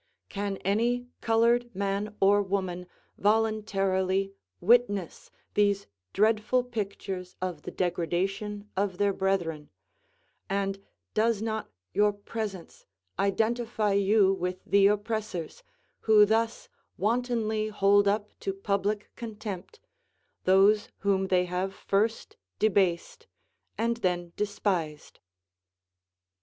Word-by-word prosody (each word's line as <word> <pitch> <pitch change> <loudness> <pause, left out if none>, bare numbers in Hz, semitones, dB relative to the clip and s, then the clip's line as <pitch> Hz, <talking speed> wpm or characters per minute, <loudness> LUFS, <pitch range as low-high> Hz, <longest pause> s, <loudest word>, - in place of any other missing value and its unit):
Can 200 -1 -3
any 235 +5 +1 0.2
colored 235 +2 +3
man 200 +2 -2
or 200 +1 +5
woman 185 -2 -2 0.3
voluntarily 195 -3 +1 0.3
witness 205 -3 +2 0.2
these 200 -1 +2 0.3
dreadful 215 +4 +2
pictures 200 -5 -5
of 180 -5 -4
the - - -7
degradation 195 +4 -2
of 190 -1 -1
their 200 0 +2
brethren, 175 -6 -1 0.8
and 195 0 -1 0.3
does 220 0 +1
not 220 -1 -3 0.2
your 210 0 +4
presence 205 -3 -7 0.3
identify 220 +1 +1
you 200 0 +4
with 180 -1 -4
the 200 0 +5
oppressors, 210 - -2 0.4
who 215 -1 +6
thus 225 +2 0 0.3
wantonly 220 -1 0
hold 205 -1 +3
up 205 +1 0
to 195 - -2
public 200 +1 -1
contempt 215 - -7 0.7
those 200 +3 +4
whom 195 -2 +1
they 180 -1 +2
have 185 +2 -3
first 215 +3 -1 0.2
debased, 195 - +1 0.5
and 230 +1 0
then 175 -5 -1
despised. 185 -7 -2
200 Hz, 100 wpm, -28 LUFS, 190-220 Hz, 0.8 s, who